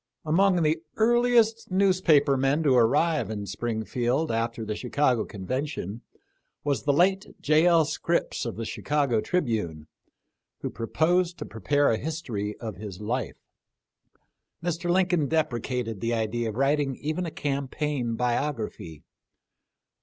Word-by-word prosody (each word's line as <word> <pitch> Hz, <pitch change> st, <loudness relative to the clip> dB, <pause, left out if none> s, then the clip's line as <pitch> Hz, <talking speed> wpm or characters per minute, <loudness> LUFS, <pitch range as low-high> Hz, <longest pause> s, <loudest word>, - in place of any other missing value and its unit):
Among 180 Hz, +2 st, +3 dB
the 155 Hz, +1 st, +1 dB
earliest 235 Hz, 0 st, +3 dB
newspaper 185 Hz, -7 st, +3 dB
men 135 Hz, +4 st, +1 dB
to 140 Hz, -4 st, +4 dB
arrive 135 Hz, -, +3 dB
in 105 Hz, -2 st, -4 dB
Springfield 120 Hz, -, -1 dB
after 115 Hz, 0 st, -2 dB
the 105 Hz, 0 st, -3 dB
Chicago 125 Hz, -2 st, +1 dB
convention 115 Hz, -, -4 dB, 0.6 s
was 145 Hz, -1 st, 0 dB
the 145 Hz, -, +4 dB
late 190 Hz, +7 st, +2 dB
J. 155 Hz, +3 st, +3 dB
L. 165 Hz, -2 st, +5 dB
Scripps 170 Hz, +3 st, -1 dB
of 115 Hz, -, -4 dB
the 115 Hz, -, -4 dB
Chicago 140 Hz, -3 st, 0 dB
Tribune, 110 Hz, -, -1 dB, 0.8 s
who -, -, -3 dB
pro 115 Hz, -, -5 dB
posed 175 Hz, +4 st, +1 dB
to -, -, -6 dB
prepare 145 Hz, +6 st, +1 dB
a 110 Hz, -, +1 dB
history 120 Hz, -10 st, -4 dB
of 110 Hz, -6 st, -6 dB
his 100 Hz, -2 st, -8 dB
life. 120 Hz, +5 st, -3 dB, 1.3 s
Mr. 175 Hz, 0 st, -2 dB
Lincoln 180 Hz, -4 st, +2 dB
deprecated 125 Hz, -7 st, -1 dB
the 115 Hz, 0 st, 0 dB
idea 115 Hz, +1 st, -1 dB
of 105 Hz, -, -6 dB
writing 135 Hz, +1 st, +1 dB
even 155 Hz, +6 st, -3 dB
a -, -, -2 dB
campaign 140 Hz, -4 st, -2 dB
biography. 115 Hz, -, -2 dB
140 Hz, 130 wpm, -26 LUFS, 115-160 Hz, 1.3 s, L